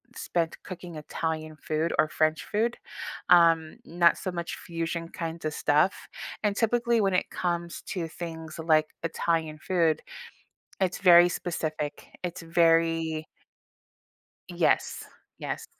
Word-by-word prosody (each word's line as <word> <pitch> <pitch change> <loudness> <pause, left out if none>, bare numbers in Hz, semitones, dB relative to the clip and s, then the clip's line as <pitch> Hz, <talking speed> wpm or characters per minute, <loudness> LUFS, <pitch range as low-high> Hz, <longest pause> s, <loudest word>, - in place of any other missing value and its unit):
spent 170 -2 -2
cooking 175 -3 -8
Italian 155 0 -4
food 155 +2 -1
or 155 - +4
French 155 -1 +1
food, 225 +3 0 0.5
um, 165 -2 +5
not 170 0 +4
so 185 - -3
much 170 -1 -4
fusion 165 0 -4
kinds 165 0 -5
of 155 - -1
stuff, 150 +6 +3 0.5
and, 205 -1 +1
typically, 235 0 +2
when 195 -2 +2
it - - +1
comes 170 -1 -2
to 170 -4 -3
things 160 -1 -7
like 155 -1 +3 0.2
Italian 165 -1 -1
food, 165 -4 +1 0.8
it's 185 -1 +1
very 175 -2 +8
specific, 155 -4 -3 0.2
it's 175 0 -4
very 165 -1 +2 1.2
Yes, - - +1 0.4
yes. - - -4
165 Hz, 120 wpm, -28 LUFS, 160-175 Hz, 1.2 s, very